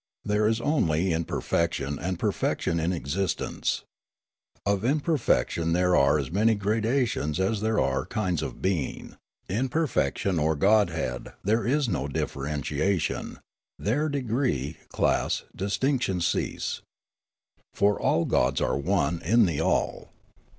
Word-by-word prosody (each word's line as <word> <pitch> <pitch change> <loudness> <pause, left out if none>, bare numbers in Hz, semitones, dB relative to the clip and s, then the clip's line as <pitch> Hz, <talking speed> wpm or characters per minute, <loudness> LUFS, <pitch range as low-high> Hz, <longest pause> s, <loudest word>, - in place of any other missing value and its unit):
There 105 +1 +2
is 110 +1 +1
only 90 - +1
imperfection 80 -3 -1
and 90 0 -2
perfection 85 - 0
in 80 +3 0
existence. 90 +2 -2 0.8
Of 100 0 +1
imperfection 135 - +1
there 90 +1 +3
are 70 0 +4
as 70 -2 -3
many 110 +4 +3
gradations 110 - 0
as 100 +2 0
there 110 0 +1
are 65 -1 0
kinds 95 -8 -1
of 65 -5 -6
being; 90 -9 -2 0.3
in 120 +8 -1
per 160 +5 +1
fection 90 - 0
or 80 +1 +2
godhead 85 - +1
there 110 +4 +1
is 140 +1 +2
no 80 -9 -1
differentiation; 75 +5 -2 0.4
there 145 +9 0
degree, 120 - -1
class, - - +1
distinction 100 +1 0
cease. 85 - -1 0.9
For 100 0 +1
all 85 - +2
gods 65 +2 +2
are - - 0
one 85 0 0
in 110 +6 +4
the 80 -4 -1
all. - - 0
95 Hz, 125 wpm, -27 LUFS, 80-110 Hz, 0.9 s, are